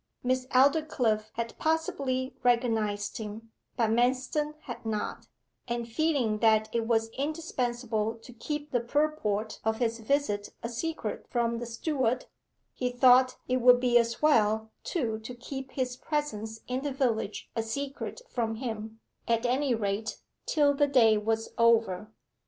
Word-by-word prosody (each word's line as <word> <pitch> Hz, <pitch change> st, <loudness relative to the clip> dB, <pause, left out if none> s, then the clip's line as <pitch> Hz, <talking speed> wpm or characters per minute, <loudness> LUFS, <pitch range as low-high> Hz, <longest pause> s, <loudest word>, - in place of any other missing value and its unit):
Miss 255 Hz, 0 st, 0 dB
Aldclyffe 255 Hz, -6 st, +2 dB
had 230 Hz, 0 st, -4 dB
possibly 275 Hz, -5 st, 0 dB
recognized 225 Hz, -4 st, +1 dB
him, 220 Hz, +1 st, -7 dB, 0.3 s
but 225 Hz, -2 st, +2 dB
Manston 260 Hz, +6 st, +1 dB
had 240 Hz, -, -8 dB
not, 215 Hz, -2 st, -3 dB, 0.4 s
and 235 Hz, -1 st, -2 dB
feeling 245 Hz, -4 st, +1 dB
that 220 Hz, -1 st, +4 dB
it 230 Hz, -1 st, 0 dB
was 225 Hz, -1 st, +2 dB
indispensable 245 Hz, -6 st, -2 dB
to 230 Hz, +2 st, -14 dB
keep 295 Hz, +5 st, -5 dB
the 245 Hz, -, +2 dB
purport 235 Hz, -5 st, -1 dB
of 220 Hz, 0 st, +1 dB
his 230 Hz, -1 st, 0 dB
visit 220 Hz, -4 st, 0 dB
a 230 Hz, -, -2 dB
secret 235 Hz, -2 st, -4 dB
from 235 Hz, -1 st, 0 dB
the 240 Hz, -, -5 dB
steward, 255 Hz, 0 st, -1 dB, 0.5 s
he 250 Hz, -, -1 dB
thought 255 Hz, +1 st, +5 dB
it 255 Hz, -, +2 dB
would 250 Hz, 0 st, +6 dB
be 245 Hz, -1 st, +1 dB
as 235 Hz, +4 st, -1 dB
well, 220 Hz, -6 st, +3 dB
too, 230 Hz, -10 st, -1 dB
to 220 Hz, +3 st, -8 dB
keep 265 Hz, +1 st, -7 dB
his 255 Hz, -2 st, -2 dB
presence 225 Hz, -9 st, -3 dB
in 255 Hz, +1 st, -2 dB
the 285 Hz, 0 st, -2 dB
village 235 Hz, -6 st, -1 dB
a 225 Hz, -, +1 dB
secret 275 Hz, -, -5 dB
from 225 Hz, -, -2 dB
him; 220 Hz, -2 st, -5 dB, 0.3 s
at 230 Hz, +1 st, +1 dB
any 255 Hz, +1 st, +2 dB
rate, 210 Hz, 0 st, -2 dB, 0.3 s
till 290 Hz, -3 st, +4 dB
the 290 Hz, 0 st, +3 dB
day 235 Hz, -6 st, +5 dB
was 220 Hz, +1 st, -1 dB
over. 225 Hz, -3 st, +3 dB
240 Hz, 145 wpm, -29 LUFS, 225-265 Hz, 0.5 s, would